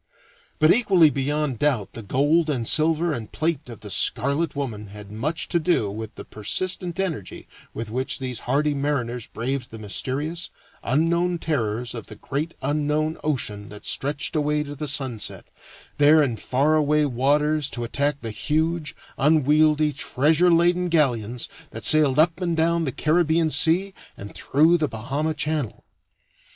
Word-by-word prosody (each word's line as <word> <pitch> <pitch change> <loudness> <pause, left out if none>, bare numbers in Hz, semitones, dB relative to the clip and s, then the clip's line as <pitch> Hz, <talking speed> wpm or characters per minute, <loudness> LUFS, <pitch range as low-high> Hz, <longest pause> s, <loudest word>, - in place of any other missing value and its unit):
But 155 +2 +5
equally 190 -9 +4
beyond 140 -2 -1
doubt 130 -9 0
the 115 - -7
gold 145 - +1
and 120 -6 -1
silver 160 +1 +3
and 115 -6 -6
plate 155 -4 -2
of 115 - -10
the 105 - -8
"Scarlet 140 - +1
Woman" 115 -7 -4
had 100 0 -11
much 145 +10 -3
to 170 - +1
do 155 - +1
with 110 +1 -7
the - - -9
persistent 175 - -2
energy 165 - -4 0.3
with 110 -1 -5
which 130 +3 -2
these 125 -4 -5
hardy 145 +3 +2
mariners 125 -5 -2
braved 130 +2 -4
the 110 - -9
mysterious, 140 - -3 0.3
unknown 170 +6 +1
terrors 120 -7 -2
of 115 -3 -8
the 105 - -10
great 145 +9 -4
unknown 150 +2 -1
ocean 105 -9 -2
that 105 0 -11
stretched 145 +4 -1
away 150 0 +1
to 145 -1 -8
the 150 +1 -4
sunset, 130 -5 -1 0.5
there 150 +1 +6
in 125 -5 -1
far 135 +7 0
away 150 0 +2
waters 145 +3 +1
to 120 - -4
attack 140 +4 -1
the 115 - -4
huge, 155 +5 -1 0.2
unwieldy, 150 +1 +3
treasure 155 +6 +2
laden 175 +1 +3
galleons 125 -8 +1 0.2
that - - -5
sailed 150 -4 +4
up 165 +3 +3
and 170 -2 -1
down 165 +1 +1
the 135 - -1
Caribbean 160 +2 +1
Sea 185 +6 +3 0.2
and 100 +1 -9
through 160 +5 +3
the 155 - +1
Bahama 140 +7 -3
Channel. 150 -6 -3
150 Hz, 155 wpm, -23 LUFS, 125-160 Hz, 0.5 s, there